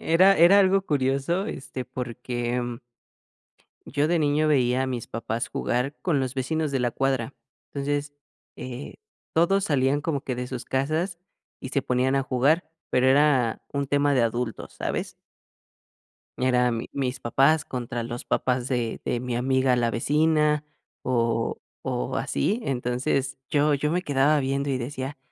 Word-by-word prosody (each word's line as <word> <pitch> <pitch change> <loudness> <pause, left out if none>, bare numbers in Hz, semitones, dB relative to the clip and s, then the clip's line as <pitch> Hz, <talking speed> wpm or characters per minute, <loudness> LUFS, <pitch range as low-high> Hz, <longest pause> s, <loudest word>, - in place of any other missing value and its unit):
era 185 +3 +7 0.2
era 200 +3 +7
algo 195 0 +4
curioso, 145 +4 0
este, 135 - -5
porque 125 -1 -3 1.3
yo 145 +2 +1
de 170 -1 +2
niño 150 +1 +2
veía 130 -2 +3
a - - -2
mis 125 -3 -4
papás 115 0 -3
jugar 125 +4 -1
con 160 -6 +1
los 130 -2 -2
vecinos 155 +3 -1
de 135 - 0
la 120 - +1
cuadra, 135 0 -1 0.4
entonces, 145 +1 -2 0.4
eh, 130 +2 -7 0.4
todos 190 +4 +3
salían 140 0 +2
como 145 -3 -1
que 125 - -2
de 125 0 -4
sus 125 -1 -6
casas 155 +7 -1 0.4
y 130 - -6
se 140 0 0
ponían 130 +2 +1
a - - +2
jugar, 140 +7 +2 0.2
pero 125 +1 +3
era 135 -4 +3
un 140 -1 -2
tema 145 +1 +2
de 125 - +3
adultos, 115 -1 -3
¿sabes? - - -3 1.3
Eran 125 -2 +2
mi 115 - -5
mis 130 -2 -2
papás 140 +6 +3
contra 120 -2 -4
los 120 +1 -5
papás 125 -1 0
de 120 -4 -2
de 120 - -1
mi 125 0 -3
amiga, 130 +1 +2
la 120 -1 +1
vecina, 150 +4 +2 0.4
o 115 -2 0 0.2
o, 60 - -2
así. 215 +5 0
Entonces 130 - -1
yo 150 0 +3
yo 150 +2 0
me 180 +2 0
quedaba 145 0 +3
viendo, 140 +1 -1
y 135 - +1
decía: 130 +2 -5
135 Hz, 155 wpm, -25 LUFS, 125-150 Hz, 1.3 s, era